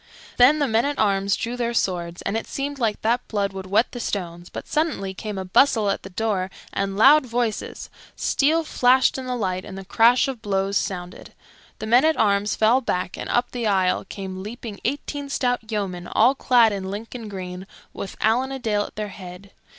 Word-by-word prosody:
Then 255 +5 +6
the 290 -2 +1
men 225 0 +2
at 285 0 -2
arms 200 -1 +2
drew 235 +2 -3
their 240 -1 -2
swords, 175 -4 -1
and - - -2
it 225 - -3
seemed 280 0 -4
like 220 -4 0
that 235 +3 +1
blood 200 -2 -1
would 190 -1 -7
wet 205 +5 +2
the 245 - -7
stones; 175 -5 -4
but - - -8
suddenly 300 -12 -1
came 210 +1 -6
a 190 - -4
bustle 215 +1 +3
at - - -3
the 190 - -9
door 195 -1 -1 0.2
and 195 0 -2
loud 270 +5 +6
voices, 235 -2 -2 0.3
steel 315 +4 +2
flashed 260 -3 +3
in 260 - -6
the 250 - -1
light, 185 -5 -2
and 195 - -9
the 195 - -8
crash 235 +6 +4
of 260 -4 -5
blows 195 -2 -1
sounded. 180 -3 -4 0.4
The - - -6
men 240 +5 +5
at 315 0 +3
arms 205 -1 +2
fell 230 +4 +3
back, 180 -7 -2
and - - -6
up 240 - +1
the 240 -3 -2
aisle 185 -3 +2
came 190 -2 -6
leaping 215 0 -7
eighteen 285 +2 -3
stout 245 -4 -1
yeomen 185 -4 -3
all 240 +5 +4
clad 240 -5 +4
in 190 -1 -4
Lincoln 225 +2 -6
green, 185 -1 -7 0.3
with 195 - -7
Allan 245 +5 +2
a 270 - -3
Dale 210 -4 0
at - - -12
their 210 -1 -4
head. 185 0 -11
215 Hz, 205 wpm, -23 LUFS, 195-245 Hz, 0.4 s, Then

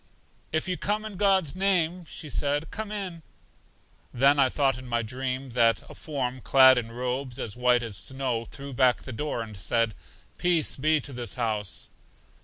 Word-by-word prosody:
If 160 +3 0
you 180 -1 -1
come 210 +2 -1
in 215 -2 -7
God's 190 -6 +2
name, 180 -3 +1
said 145 0 -1
she, - - -14
come 215 -1 -5
in. 190 -5 -4 0.9
Then 140 +3 +4
I 135 -2 +5
thought 135 -2 +1
in 130 - -10
my 120 -1 0
dream 130 +2 -4
that 115 -1 +3
a - - -10
form, 130 -4 -4
clad 130 -1 +7
in 115 -1 -7
robes 125 +1 -3
as 105 - -4
white 125 0 +3
as 110 -4 -4
snow, 125 +2 -2
threw 140 +3 -9
back 125 -1 +3
the 130 - -7
door, 120 -1 -2
and 110 -2 -10
said, 115 +4 0 0.5
Peace 175 -3 +2
be 155 +3 +2
to 140 - -6
this 120 -1 -4
house. 110 -6 -2
130 Hz, 180 wpm, -27 LUFS, 120-155 Hz, 0.9 s, clad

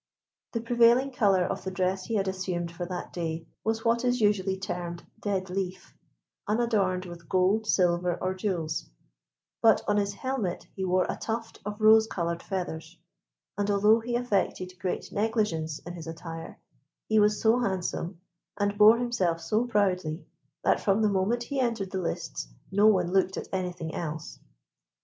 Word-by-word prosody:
The 230 - -1
prevailing 240 +3 +4
colour 200 -7 +3
of - - -3
the 190 - -3
dress 185 0 -1
he 230 - -2
had 195 -2 +1
assumed 185 -2 -2
for 175 +1 -5
that 180 0 -6
day 165 -1 -3 0.2
was 225 +1 -1
what 230 +1 +2
is 245 0 +2
usually 200 -3 +2
termed 175 -2 -5 0.2
"dead 190 -3 -2
leaf," 185 -1 -4 0.5
unadorned 210 -5 +1
with 170 -2 -10
gold, 190 +4 +2
silver, 175 -2 +2
or 185 0 -1
jewels; 175 -5 -2 0.7
but 225 -2 +5
on 205 - +2
his 200 0 0
helmet 250 -7 -2
he 190 - -3
wore 185 0 +2
a - - -3
tuft 225 0 -4
of 210 +1 -5
rose 220 0 +6
coloured 170 -4 -2
feathers, 170 -3 -5 0.6
and 205 0 0
although 210 +3 +5
he 240 +1 -3
affected 190 -6 -1
great 185 - -3
negligence 205 -8 0
in 175 - -9
his 165 -2 -8
attire, 165 0 -7 0.5
he 220 0 +4
was 210 0 +3
so 225 +2 +4
handsome, 185 -4 -2 0.4
and 205 0 -1
bore 215 +2 +8
himself 215 -9 0
so 215 +8 0
proudly, 185 -7 0 0.4
that - - +3
from 205 +1 +2
the 215 - +4
moment 205 +5 +1
he 275 +2 -3
entered 230 -7 -1
the 190 - -2
lists 165 - -4 0.2
no 205 +2 +5
one 180 -5 +3
looked 190 -1 +2
at - - -5
anything 180 -3 -3
else. 160 -1 -5
190 Hz, 165 wpm, -28 LUFS, 180-220 Hz, 0.7 s, bore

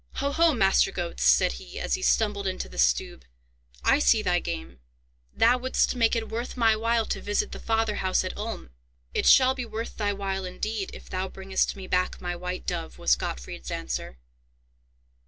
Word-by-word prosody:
"Ho, 280 0 -1
ho! 325 0 +3
Master 195 -2 +3
Goetz," 175 -2 -4
said - - +5
he, - - -8
as - - -2
he 375 - 0
stumbled 205 - +1
into 185 0 -3
the - - -8
Stube, 60 +1 +1 0.6
"I - - +4
see - - +4
thy - - +2
game. 65 -1 -6 0.5
Thou 245 +2 +3
wouldst 260 +1 +1
make 230 -1 +3
it 225 -1 -2
worth 235 +3 -5
my 225 -2 +4
while 230 +1 +1
to - - -3
visit 205 0 -1
the - - -7
father 225 -2 0
house 185 0 +1
at 185 - -5
Ulm?" 210 - -6 0.4
"It - - +1
shall 260 0 +7
be 260 -1 -4
worth 230 0 -6
thy 205 -2 0
while, 195 -1 -3
indeed, 195 +2 -3
if - - -12
thou 185 +1 -3
bringest 190 0 -1
me 195 -1 -8
back 185 0 0
my 175 0 -3
white 180 +1 -5
dove," 170 -2 -4
was 60 - +3
Gottfried's 60 +1 -6
answer. 60 -1 -4
200 Hz, 190 wpm, -26 LUFS, 180-225 Hz, 0.6 s, shall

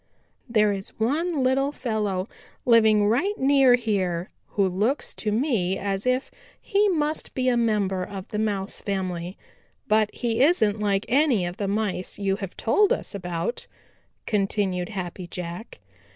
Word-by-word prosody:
"There 215 -3 +3
is 195 +2 -7
one 295 +6 0
little 270 +2 +2
fellow 210 -8 -2 0.4
living 220 -3 +5
right 345 - +1
near 270 -2 +5
here 190 -7 -1 0.2
who 200 -2 +1
looks 210 +10 -1
to 210 - -2
me 210 - +1
as 195 +3 -2
if 255 +1 0 0.3
he 410 -1 +2
must 310 -3 -1
be 255 -1 +1
a 245 - +2
member 210 -5 +1
of 190 0 -7
the 210 - -3
Mouse 200 -3 -2
family, 185 -2 -3 0.5
but 215 0 +3
he 235 0 -1
isn't 220 - +3
like 200 -1 0
any 255 - +3
of 175 +1 -5
the 200 - -2
Mice 200 -3 -1
you 195 -1 0
have 195 -3 -7
told 410 - +3
us - - -1
about," 180 +2 -4 0.6
continued 195 -3 0
Happy 185 -3 -5
Jack. 175 - -7
210 Hz, 150 wpm, -25 LUFS, 190-250 Hz, 0.6 s, living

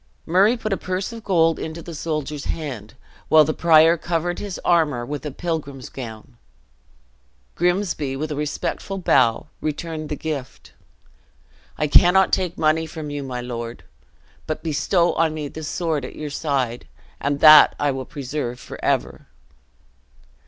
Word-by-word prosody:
Murray 195 +8 +4
put 215 -3 -2
a - - -1
purse 185 +5 -3
of 230 -1 -9
gold 165 -5 +2
into 160 +1 -6
the 170 - -8
soldier's 150 -2 -4
hand, 130 -10 -5 0.3
while 155 0 +7
the 155 +1 -1
prior 165 0 +5
covered 170 +1 -2
his 200 -3 -5
armor 150 -8 +2
with 145 +3 -5
a - - -3
pilgrim's 140 -4 -5
gown. 110 - -9 1.2
Grimsby, 175 -6 0
with 155 +3 -4
a - - -2
respectful 150 +6 -3
bow, 130 -10 +3 0.2
returned 155 0 -4
the 150 - -2
gift; 145 -5 -6 1.0
"I 150 - +1
cannot 180 +5 +5
take 180 -2 0
money 160 +1 +2
from 155 -2 -7
you, 145 0 -4
my 130 -2 -5
lord. 120 -1 -6 0.6
But 155 0 -4
bestow 170 +3 +1
on 160 -1 +1
me 150 -2 -4
the 160 - -8
sword 155 -2 -2
at 125 - -8
your 150 -1 -6
side, 130 - -2 0.3
and 140 0 -1
that 155 -1 +9
I 145 -1 +2
will 130 -1 -4
preserve 135 -3 -5
forever." - - -3
155 Hz, 150 wpm, -22 LUFS, 140-170 Hz, 1.2 s, that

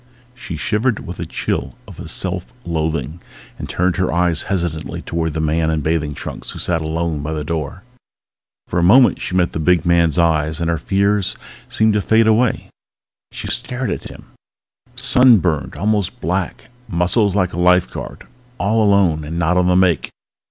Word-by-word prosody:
She 115 -10 -7
shivered 105 - -1
with 90 - -8
a - - -4
chill - - -3
of 90 -5 -9
self 90 +1 -3
loathing 80 0 -2 0.4
and - - -6
turned 90 0 0
her 95 - 0
eyes 85 -2 +1
hesitantly 85 -4 -2
toward 80 -2 -2
the - - -1
big 80 - 0
man 80 +1 +1
in 80 -1 0
bathing 75 -1 -1
trunks - - -7
who - - -6
sat 85 -2 0
alone 80 -1 -2
by 75 +2 -4
the 75 -1 -3
door. 80 +5 -4 0.8
For 90 - -1
a - - +1
moment 120 +8 +5
she 90 - -3
met 90 -2 +2
the - - -4
big 90 +2 +2
man's 85 -1 +3
eyes 80 -2 +1
and 85 0 0
her 85 - -1
fears 100 0 +1 0.3
seemed 110 -1 +2
to 105 - +1
fade 110 +2 +3
away! 110 +2 +1 0.6
She - - -7
stared 125 0 -2
at - - -5
him... - - -13 0.7
sunburned 90 - +4
almost 105 -3 -1
black. 90 +3 -3 0.2
Muscles 95 +4 +1
like 95 -3 +1
a - - -5
lifeguard. 90 0 +1 0.3
All 110 +4 +1
alone 95 -7 +3
and 80 +3 -5
not 85 +1 +1
on 90 0 +2
the 90 - +3
make. 90 -5 +2
85 Hz, 175 wpm, -19 LUFS, 80-100 Hz, 0.8 s, moment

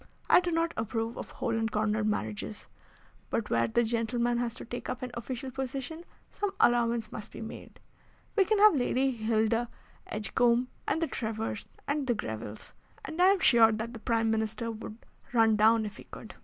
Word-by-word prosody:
I - - +7
do 360 - -2
not 330 0 +1
approve 225 +1 -2
of - - -7
hole 235 -3 -2
and 225 -1 0
corner 215 0 +1
marriages, 110 - -3 0.6
but - - -2
where 115 0 +3
the 235 - +2
gentleman 235 +1 0
has 235 -1 -2
to - - -8
take 245 +1 -6
up 250 - -4
an 250 - -4
official 255 +2 -5
position 270 +5 -5 0.3
some 410 - -2
allowance 235 -2 +3
must 210 - -7
be - - -9
made. 220 -1 -9 0.6
We 395 -3 +5
can 430 +3 +2
have 420 0 +7
Lady 265 -1 +1
Hilda 225 0 +1 0.4
Edgecombe, 240 +3 +1 0.2
and 325 - +1
the - - +1
Trevors, 220 -3 -4 0.2
and 285 -1 -1
the 240 - +2
Grevilles, 110 - -6 0.3
and 320 +2 -3
I 365 - +7
am 390 0 +4
sure 230 -2 +6
that 220 +2 -3
the 230 - -8
Prime 225 0 +1
Minister 220 +1 -1
would 215 0 -8 0.4
run 225 -2 +5
down 220 +1 +4
if 205 -1 -7
he - - -11
could." - - -10
230 Hz, 185 wpm, -30 LUFS, 220-255 Hz, 0.6 s, I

